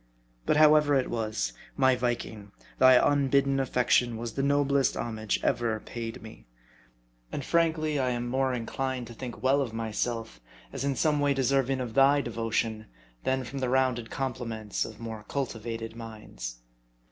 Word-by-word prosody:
But -, -, +3 dB
however 150 Hz, -1 st, +6 dB
it 130 Hz, -2 st, +1 dB
was, 110 Hz, -, -2 dB, 0.2 s
my 130 Hz, -1 st, +4 dB
Viking, 120 Hz, -4 st, -3 dB, 0.3 s
thy 130 Hz, 0 st, +8 dB
unbidden 140 Hz, 0 st, +3 dB
affection 125 Hz, -2 st, +2 dB
was 115 Hz, 0 st, -5 dB
the 135 Hz, -, -1 dB
noblest 140 Hz, -1 st, +2 dB
homage 110 Hz, -2 st, -2 dB
ever 115 Hz, -2 st, +1 dB
paid 115 Hz, +2 st, -7 dB
me. 110 Hz, -, -12 dB, 0.8 s
And 140 Hz, -, -4 dB
frankly, 160 Hz, -3 st, +1 dB
I 130 Hz, -1 st, +1 dB
am 120 Hz, -1 st, -2 dB
more 130 Hz, +1 st, +1 dB
jKlined 125 Hz, +1 st, -3 dB
to 120 Hz, -, -10 dB
think 120 Hz, +1 st, -8 dB
well 135 Hz, +2 st, +4 dB
of 120 Hz, -5 st, -3 dB
myself, 115 Hz, -, -3 dB, 0.3 s
as -, -, -3 dB
in 140 Hz, -1 st, 0 dB
some 150 Hz, 0 st, +2 dB
way 145 Hz, -1 st, +2 dB
deserving 135 Hz, 0 st, +2 dB, 0.2 s
thy 135 Hz, +2 st, +5 dB
devotion, 115 Hz, -3 st, -2 dB, 0.4 s
than 130 Hz, 0 st, +1 dB
from 135 Hz, +2 st, -6 dB
the 130 Hz, -1 st, -1 dB
rounded 130 Hz, -3 st, +1 dB
compliments 115 Hz, -5 st, -3 dB
of -, -, -10 dB
more 110 Hz, -2 st, -6 dB
cultivated 115 Hz, -4 st, -4 dB
minds. 105 Hz, -, -8 dB
125 Hz, 150 wpm, -28 LUFS, 115-135 Hz, 0.8 s, thy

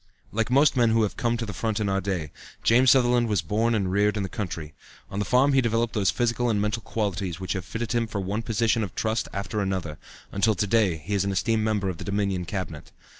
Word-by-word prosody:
Like 115 Hz, +1 st, -1 dB
most 140 Hz, +3 st, +4 dB
men 120 Hz, -2 st, +4 dB
who 110 Hz, 0 st, +3 dB
have 105 Hz, -, -2 dB
come 120 Hz, -2 st, 0 dB
to 115 Hz, -, -3 dB
the 100 Hz, -, -6 dB
front 110 Hz, +3 st, -2 dB
in 105 Hz, -, 0 dB
our 95 Hz, 0 st, 0 dB
day, 90 Hz, -6 st, -3 dB, 0.3 s
James 125 Hz, +3 st, +5 dB
Sutherland 120 Hz, -2 st, +4 dB
was 105 Hz, -7 st, 0 dB
born 110 Hz, +7 st, +1 dB
and 95 Hz, -4 st, 0 dB
reared 105 Hz, +2 st, +2 dB
in 100 Hz, -, -1 dB
the 95 Hz, -, -4 dB
country. 85 Hz, -6 st, -5 dB, 0.4 s
On 100 Hz, -, -3 dB
the 105 Hz, -, 0 dB
farm 135 Hz, +5 st, +3 dB
he 135 Hz, -, +5 dB
developed 115 Hz, -1 st, 0 dB
those 100 Hz, -4 st, +2 dB
physical 120 Hz, 0 st, 0 dB
and 105 Hz, -2 st, +1 dB
mental 105 Hz, +2 st, -1 dB
qualities 100 Hz, -5 st, -3 dB
which 95 Hz, -, -3 dB
have 95 Hz, -2 st, -4 dB
fitted 110 Hz, +3 st, -4 dB
him 120 Hz, -2 st, +1 dB
for 110 Hz, -2 st, -4 dB
one 100 Hz, +3 st, -2 dB
position 115 Hz, 0 st, +1 dB
of 95 Hz, -, -6 dB
trust 110 Hz, +1 st, -1 dB
after 100 Hz, +2 st, -3 dB
another, 95 Hz, -6 st, -3 dB, 0.3 s
until 105 Hz, +2 st, +2 dB
to 105 Hz, -, 0 dB
day 105 Hz, -5 st, +2 dB
he 85 Hz, +7 st, -6 dB
is 100 Hz, -2 st, +2 dB
an 100 Hz, -, -1 dB
esteemed 110 Hz, +3 st, +1 dB
member 105 Hz, -3 st, 0 dB
of 90 Hz, -3 st, -4 dB
the -, -, -5 dB
Dominion 100 Hz, -3 st, -1 dB
Cabinet. 90 Hz, -5 st, -5 dB
105 Hz, 245 wpm, -25 LUFS, 95-115 Hz, 0.4 s, James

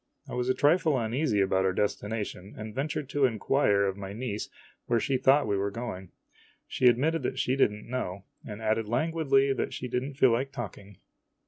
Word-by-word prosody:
I -, -, -8 dB
was 125 Hz, 0 st, -1 dB
a 130 Hz, -, +2 dB
trifle 150 Hz, 0 st, +3 dB
uneasy 115 Hz, -1 st, 0 dB
about 95 Hz, -1 st, +2 dB
our 95 Hz, 0 st, +1 dB
destination, 105 Hz, -1 st, -3 dB
and 110 Hz, 0 st, -7 dB
ventured 140 Hz, +2 st, -3 dB
to 145 Hz, -2 st, +2 dB
inquire 110 Hz, -3 st, +2 dB
of 95 Hz, 0 st, -2 dB
my 100 Hz, 0 st, -6 dB
niece 110 Hz, -2 st, -4 dB, 0.4 s
where 120 Hz, -1 st, +2 dB
she 135 Hz, +5 st, 0 dB
thought 135 Hz, +3 st, +4 dB
we 105 Hz, -, 0 dB
were 100 Hz, +1 st, 0 dB
going. 100 Hz, -4 st, -6 dB, 0.6 s
She 125 Hz, -, +2 dB
admitted 145 Hz, +7 st, +3 dB
that 130 Hz, -, -3 dB
she 130 Hz, 0 st, +1 dB
did 135 Hz, -, +4 dB
n't 105 Hz, 0 st, -10 dB
know, 100 Hz, -7 st, -4 dB, 0.2 s
and 105 Hz, 0 st, -8 dB
added 110 Hz, 0 st, 0 dB
languidly 135 Hz, +1 st, +2 dB
that 130 Hz, -, -3 dB
she 125 Hz, -, -5 dB
did 125 Hz, 0 st, -1 dB
n't 135 Hz, +1 st, -7 dB
feel 130 Hz, -4 st, +5 dB
like 130 Hz, +4 st, 0 dB
talking. 100 Hz, -6 st, -8 dB
120 Hz, 200 wpm, -28 LUFS, 105-135 Hz, 0.6 s, feel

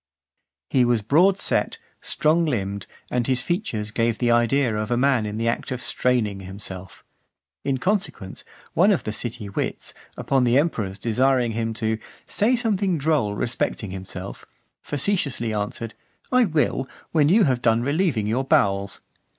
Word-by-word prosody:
XX. 70 Hz, 0 st, -60 dB
He 130 Hz, -, +4 dB
was 120 Hz, -3 st, +1 dB
broad 175 Hz, -, +4 dB
set, 455 Hz, -, +1 dB, 0.2 s
strong 160 Hz, +3 st, +2 dB
limbed, 100 Hz, -9 st, -2 dB, 0.2 s
and 125 Hz, -1 st, 0 dB
his 130 Hz, -2 st, +1 dB
features 145 Hz, -, -2 dB
gave 115 Hz, 0 st, 0 dB
the 120 Hz, -1 st, +1 dB
idea 120 Hz, 0 st, +2 dB
of 105 Hz, 0 st, -2 dB
a 120 Hz, -, +1 dB
man 130 Hz, -4 st, +2 dB
in 105 Hz, +1 st, -4 dB
the 115 Hz, +1 st, -1 dB
act 115 Hz, -, -1 dB
of 130 Hz, -, -3 dB
straining 120 Hz, -6 st, 0 dB
himself. 95 Hz, -1 st, -9 dB, 0.6 s
In 135 Hz, -1 st, 0 dB
consequence, 180 Hz, -, -2 dB, 0.3 s
one 190 Hz, +6 st, +5 dB
of 190 Hz, -, +1 dB
the 105 Hz, -, -3 dB
city 115 Hz, -1 st, -5 dB
wits, 100 Hz, -, -4 dB, 0.2 s
upon 135 Hz, -2 st, +1 dB
the 120 Hz, +1 st, +4 dB
emperor's 110 Hz, -, 0 dB
desiring 125 Hz, +3 st, +2 dB
him 115 Hz, 0 st, -2 dB
"to 110 Hz, 0 st, -1 dB, 0.3 s
say 230 Hz, +5 st, +2 dB
something 200 Hz, -7 st, +1 dB
droll 140 Hz, -9 st, +1 dB
respecting 110 Hz, -3 st, -2 dB
himself," 95 Hz, 0 st, -7 dB, 0.4 s
facetiously 145 Hz, -, 0 dB
answered, 105 Hz, +2 st, -3 dB, 0.4 s
"I 255 Hz, -1 st, +5 dB
will, 150 Hz, -6 st, 0 dB, 0.2 s
when 150 Hz, -3 st, +3 dB
you 210 Hz, +5 st, +5 dB
have 130 Hz, -6 st, +1 dB
done 115 Hz, 0 st, +3 dB
relieving 145 Hz, -, +1 dB
your 115 Hz, +5 st, 0 dB
bowels." 100 Hz, -9 st, +1 dB
120 Hz, 160 wpm, -23 LUFS, 105-150 Hz, 0.6 s, one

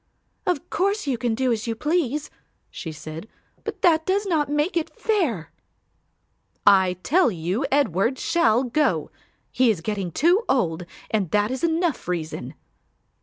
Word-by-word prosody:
"Of 355 Hz, -6 st, 0 dB
course 400 Hz, +3 st, 0 dB
you 275 Hz, -3 st, 0 dB
can 235 Hz, -2 st, 0 dB
do 255 Hz, +1 st, +1 dB
as 230 Hz, 0 st, -2 dB
you 225 Hz, -, -1 dB
please," 300 Hz, +1 st, -1 dB, 0.4 s
she 160 Hz, -, -6 dB
said, 155 Hz, +4 st, -8 dB, 0.4 s
"but -, -, -6 dB
that 320 Hz, -3 st, +5 dB
does 395 Hz, +4 st, 0 dB
not 315 Hz, -7 st, +1 dB
make 295 Hz, +5 st, 0 dB
it 335 Hz, -2 st, 0 dB
fair." 295 Hz, -, 0 dB, 1.1 s
"I 190 Hz, -3 st, +6 dB
tell 360 Hz, 0 st, +4 dB
you 185 Hz, -, -2 dB
Edward 260 Hz, -, +2 dB
shall 255 Hz, -9 st, +2 dB
go; 295 Hz, +4 st, 0 dB, 0.4 s
he 255 Hz, -1 st, +3 dB
is 200 Hz, -7 st, 0 dB
getting 195 Hz, -2 st, -3 dB
too 350 Hz, -, +3 dB
old 175 Hz, -9 st, 0 dB, 0.2 s
and 205 Hz, -6 st, 0 dB
that 210 Hz, +5 st, +1 dB
is 260 Hz, +5 st, -4 dB
enough 330 Hz, -, 0 dB
reason." 155 Hz, -6 st, -4 dB
255 Hz, 150 wpm, -24 LUFS, 195-320 Hz, 1.1 s, I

